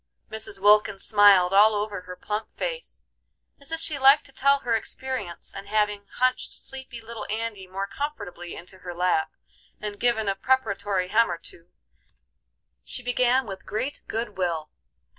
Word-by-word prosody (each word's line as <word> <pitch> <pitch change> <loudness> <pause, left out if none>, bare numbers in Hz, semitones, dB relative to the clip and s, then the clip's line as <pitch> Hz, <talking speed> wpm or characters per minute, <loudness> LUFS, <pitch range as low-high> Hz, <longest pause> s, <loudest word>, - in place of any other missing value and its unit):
Mrs. 220 -2 -3
Wilkins 205 -1 +4
smiled 200 -4 +6
all 210 +2 +7
over 205 -2 -2
her 180 0 -9
plump 210 +3 -4
face, - - -4 0.5
as 280 +3 -7
if 325 - -1
she 305 -3 -2
liked 275 +2 +7
to 275 - -15
tell 280 +1 +3
her 235 -1 +1
experience, 225 -6 -5
and 195 0 -8
having 210 -1 0
hunched 255 0 +1
sleepy 265 -3 -7
little 225 -1 -7
Andy 215 -3 -3
more 195 +2 -3
comfortably 200 - -5
into 185 +2 -11
her 180 -1 -7
lap, 175 -3 +1 0.5
and 210 -1 -5
given 235 -3 +1
a 195 - +2
preparatory 200 -5 0
hem 230 +3 +4
or - - -2
two, 170 +1 -12 1.1
she 250 - -7
began 250 +1 +2
with 195 -2 -7
great 260 +7 -3
good 220 -3 -3
will. 165 -4 -1
210 Hz, 160 wpm, -26 LUFS, 195-245 Hz, 1.1 s, all